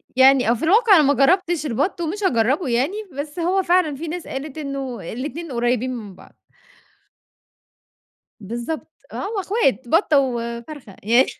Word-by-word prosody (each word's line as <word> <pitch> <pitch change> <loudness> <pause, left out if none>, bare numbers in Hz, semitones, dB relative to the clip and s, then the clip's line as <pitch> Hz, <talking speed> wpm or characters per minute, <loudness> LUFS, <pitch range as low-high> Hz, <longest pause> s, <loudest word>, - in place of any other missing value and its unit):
يعني 260 -2 +5
آه. 235 - +5
في 240 - -5
الواقع 415 +5 +5
أنا 310 - +6
ما 280 - +4
جرّبتش 340 +3 +2
البَط 305 - -1
ومش 380 +6 -3
هاجرّبه 270 +1 +1
يعني، 255 +8 +1 0.2
بس 290 +4 -6
هو 370 +3 +1
فعلًا 350 -4 +2
في 320 +5 -6
ناس 345 +2 -5
قالت 275 +2 -6
إنه 275 -4 -5
الاتنين 295 +6 -6
قريّبين 245 +1 0
من 210 -5 -9
بعض. - - -17 2.1
بالضبط. 235 +9 -5 0.3
آه، - - -7
هم - - -5
إخوات، 375 - 0
بَطّة 315 - +3
وفرخة 235 -2 -4
ي 240 +5 +5
275 Hz, 155 wpm, -21 LUFS, 245-335 Hz, 2.1 s, أنا